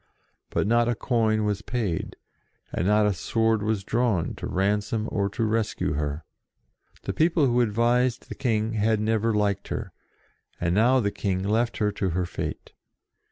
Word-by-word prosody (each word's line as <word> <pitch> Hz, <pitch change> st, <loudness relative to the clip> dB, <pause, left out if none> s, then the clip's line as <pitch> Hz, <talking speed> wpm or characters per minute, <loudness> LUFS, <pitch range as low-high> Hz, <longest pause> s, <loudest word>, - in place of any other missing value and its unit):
But -, -, 0 dB
not 120 Hz, +2 st, +3 dB
a 120 Hz, -, +1 dB
coin 110 Hz, -2 st, +1 dB
was 105 Hz, -1 st, -1 dB
paid, 110 Hz, -8 st, -3 dB, 0.6 s
and 90 Hz, -, 0 dB
not 105 Hz, +1 st, +4 dB
a 105 Hz, -, +2 dB
sword 115 Hz, +3 st, +1 dB
was 105 Hz, -2 st, -1 dB
drawn 115 Hz, -5 st, 0 dB
to -, -, -5 dB
ransom 105 Hz, +3 st, 0 dB
or 100 Hz, -1 st, 0 dB
to 115 Hz, +4 st, -2 dB
rescue 110 Hz, -7 st, 0 dB
her. 75 Hz, +1 st, -3 dB, 0.8 s
The -, -, -3 dB
people 160 Hz, -1 st, +3 dB
who 125 Hz, -1 st, +3 dB
advised 120 Hz, +2 st, +1 dB
the -, -, -6 dB
King 110 Hz, -4 st, 0 dB
had 110 Hz, 0 st, +2 dB
never 110 Hz, +1 st, +1 dB
liked 105 Hz, -2 st, 0 dB
her, -, -, -5 dB, 0.7 s
and 85 Hz, 0 st, 0 dB
now 125 Hz, +6 st, +4 dB
the 100 Hz, -2 st, 0 dB
King 95 Hz, -2 st, -2 dB
left 115 Hz, +4 st, 0 dB
her 105 Hz, -1 st, +1 dB
to 95 Hz, -2 st, -2 dB
her 90 Hz, -, +1 dB
fate. -, -, -6 dB
110 Hz, 165 wpm, -26 LUFS, 100-115 Hz, 0.8 s, not